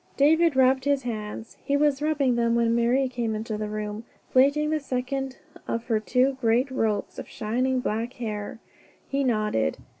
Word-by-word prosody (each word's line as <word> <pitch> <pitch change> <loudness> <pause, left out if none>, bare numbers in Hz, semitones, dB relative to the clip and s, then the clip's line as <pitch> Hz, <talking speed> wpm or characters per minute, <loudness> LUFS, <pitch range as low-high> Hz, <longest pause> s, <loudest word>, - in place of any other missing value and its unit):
David 320 +2 +4
rubbed 260 0 +3
his 285 -1 +1
hands. 220 -1 -6
He 280 - +1
was 290 -1 +2
rubbing 290 -5 +1
them 235 0 +2
when 230 0 +2
Marie 245 +3 +2
came 235 -3 -2
into 215 0 -4
the 210 0 -3
room, 210 +1 -4 0.3
plaiting 285 +4 +3
the 310 - +1
second 265 0 -3 0.3
of 230 - -2
her 225 -3 +1
two 255 +4 +1
great 240 +3 +2
ropes 220 -5 -1
of - - -8
shining 250 +4 -1
black 230 +2 -2
hair. 210 -4 -5 0.5
He 275 0 0
nodded. 215 - 0
250 Hz, 170 wpm, -26 LUFS, 220-270 Hz, 0.5 s, David